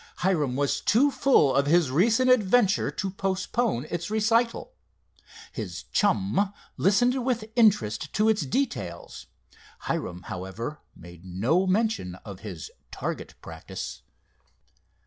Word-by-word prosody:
Hiram 150 Hz, -9 st, +1 dB
was 140 Hz, +1 st, 0 dB
too 250 Hz, +8 st, +3 dB
full 260 Hz, -, +3 dB
of 140 Hz, +1 st, +2 dB
his 165 Hz, -3 st, +3 dB
recent 225 Hz, -, +3 dB
adventure 210 Hz, -3 st, +3 dB
to 195 Hz, -2 st, -3 dB
postpone 195 Hz, -, -1 dB
its 170 Hz, +1 st, -3 dB
recital. 230 Hz, -, +1 dB, 0.8 s
His -, -, -6 dB
chum 190 Hz, -, +1 dB, 0.2 s
listened 245 Hz, +7 st, +2 dB
with 235 Hz, -4 st, -2 dB
interest 155 Hz, -, +2 dB
to 215 Hz, +1 st, +2 dB
its 220 Hz, -3 st, +3 dB
details. 275 Hz, -, -3 dB, 0.5 s
Hiram, 90 Hz, -, -4 dB
however, 105 Hz, +8 st, -6 dB, 0.2 s
made 85 Hz, 0 st, -13 dB
no 115 Hz, -, 0 dB
mention 200 Hz, -, 0 dB
of 100 Hz, -3 st, -8 dB
his 95 Hz, -8 st, -8 dB, 0.2 s
"target -, -, -5 dB
practice." -, -, -7 dB
190 Hz, 115 wpm, -26 LUFS, -, 0.8 s, too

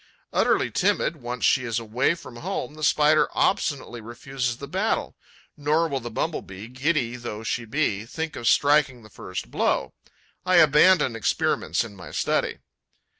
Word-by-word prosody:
Utterly -, -, +2 dB
timid 170 Hz, -, +1 dB
once 125 Hz, -2 st, -3 dB
she 130 Hz, -, +3 dB
is 115 Hz, -2 st, -2 dB
away 120 Hz, +7 st, 0 dB
from 130 Hz, -8 st, -12 dB
home, 125 Hz, +3 st, -4 dB
the 155 Hz, 0 st, -9 dB
Spider 150 Hz, +1 st, +4 dB
obstinately 140 Hz, -10 st, 0 dB
refuses 120 Hz, +2 st, -4 dB
the 140 Hz, -, -8 dB
battle; 195 Hz, +7 st, -1 dB, 0.4 s
nor 155 Hz, +3 st, +1 dB
will 140 Hz, -3 st, -2 dB
the 120 Hz, -1 st, -6 dB
Bumble 140 Hz, +7 st, -2 dB
bee, 95 Hz, +3 st, -10 dB
giddy 125 Hz, -2 st, -1 dB
though 110 Hz, -3 st, -6 dB
she 115 Hz, +1 st, -2 dB
be, 110 Hz, -4 st, -1 dB
think 160 Hz, +4 st, -4 dB
of 120 Hz, -, -4 dB
striking 140 Hz, -4 st, +3 dB
the 110 Hz, -, -16 dB
first 90 Hz, -10 st, -7 dB
blow. -, -, 0 dB, 0.5 s
I 185 Hz, 0 st, +2 dB
abandon 155 Hz, -4 st, +5 dB
experiments 90 Hz, -6 st, 0 dB
in 110 Hz, -3 st, -10 dB
my 90 Hz, -2 st, -10 dB
study. -, -, -1 dB
130 Hz, 160 wpm, -25 LUFS, 115-155 Hz, 0.5 s, abandon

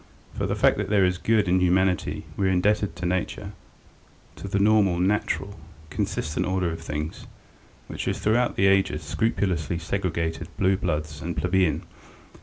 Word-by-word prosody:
For -, -, -2 dB
the -, -, -1 dB
fact -, -, +3 dB
that -, -, -2 dB
there 100 Hz, -3 st, +4 dB
is 90 Hz, 0 st, 0 dB
good 110 Hz, -3 st, +2 dB
in 90 Hz, +1 st, +3 dB
humanity 90 Hz, 0 st, +1 dB
we 95 Hz, -, +1 dB
are -, -, +2 dB
indebted 100 Hz, 0 st, +1 dB
to 85 Hz, 0 st, -5 dB
nature, 90 Hz, 0 st, -2 dB, 0.9 s
to -, -, -7 dB
the 100 Hz, -, -1 dB
normal, 100 Hz, -3 st, +4 dB
natural, 100 Hz, 0 st, -1 dB, 0.3 s
consistent 75 Hz, +1 st, -2 dB
order 95 Hz, -2 st, 0 dB
of 80 Hz, 0 st, -6 dB
things, 75 Hz, 0 st, -5 dB, 0.6 s
which -, -, -6 dB
has -, -, -1 dB
throughout 120 Hz, +3 st, +1 dB
the 95 Hz, -, +2 dB
ages 95 Hz, -5 st, +2 dB
scrupulously 85 Hz, -2 st, -1 dB
segregated 85 Hz, -2 st, -2 dB
blue 95 Hz, +1 st, +3 dB
blood 75 Hz, -5 st, -1 dB
from 75 Hz, +3 st, -6 dB
plebeian. 90 Hz, -2 st, +1 dB
90 Hz, 160 wpm, -25 LUFS, 85-100 Hz, 0.9 s, there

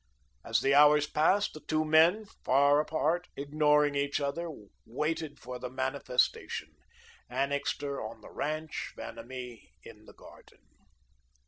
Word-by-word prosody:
As 115 Hz, -1 st, +1 dB
the 135 Hz, +1 st, +2 dB
hours 150 Hz, +1 st, +6 dB
passed, 190 Hz, +8 st, +2 dB
the 155 Hz, -, -9 dB
two 155 Hz, 0 st, -1 dB
men, 165 Hz, +7 st, +4 dB, 0.2 s
far 140 Hz, +2 st, +4 dB
apart, 160 Hz, +3 st, 0 dB
ignoring 150 Hz, 0 st, +2 dB
each 140 Hz, +1 st, 0 dB
other, 145 Hz, +4 st, -3 dB, 0.3 s
waited 150 Hz, +4 st, -3 dB
for 125 Hz, 0 st, -7 dB
the 125 Hz, 0 st, -5 dB
Manifestation, 130 Hz, -1 st, -1 dB, 0.6 s
Annixter 140 Hz, 0 st, -2 dB
on 110 Hz, 0 st, -7 dB
the -, -, -13 dB
ranch, 155 Hz, +1 st, -4 dB
Vanamee 125 Hz, -, -9 dB
in -, -, -14 dB
the -, -, -15 dB
garden. -, -, -17 dB
145 Hz, 125 wpm, -30 LUFS, 130-155 Hz, 0.6 s, hours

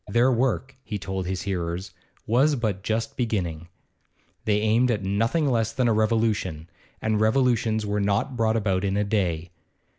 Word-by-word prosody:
Their 120 Hz, +5 st, +3 dB
work, 130 Hz, +1 st, 0 dB
he 105 Hz, -, -4 dB
told 95 Hz, -2 st, -4 dB
his 95 Hz, -2 st, -3 dB
hearers, 90 Hz, 0 st, -3 dB, 0.3 s
was 135 Hz, +7 st, +3 dB
but 110 Hz, -6 st, -2 dB
just 115 Hz, +2 st, -2 dB
beginning. 90 Hz, -9 st, -2 dB, 0.8 s
They 105 Hz, -2 st, +2 dB
aimed 110 Hz, +4 st, +3 dB
at 105 Hz, -4 st, 0 dB
nothing 115 Hz, -, +1 dB
less 115 Hz, -3 st, +1 dB
than 125 Hz, +1 st, +1 dB
a 115 Hz, -, +3 dB
revolution, 110 Hz, -7 st, 0 dB, 0.4 s
and 110 Hz, -1 st, +1 dB
revolutions 110 Hz, -2 st, +2 dB
were 105 Hz, 0 st, -1 dB
not 105 Hz, +7 st, 0 dB
brought 115 Hz, -1 st, +2 dB
about 95 Hz, -3 st, 0 dB
in 100 Hz, 0 st, 0 dB
a 105 Hz, -, +2 dB
day. 90 Hz, -5 st, -1 dB
110 Hz, 160 wpm, -25 LUFS, 95-115 Hz, 0.8 s, Their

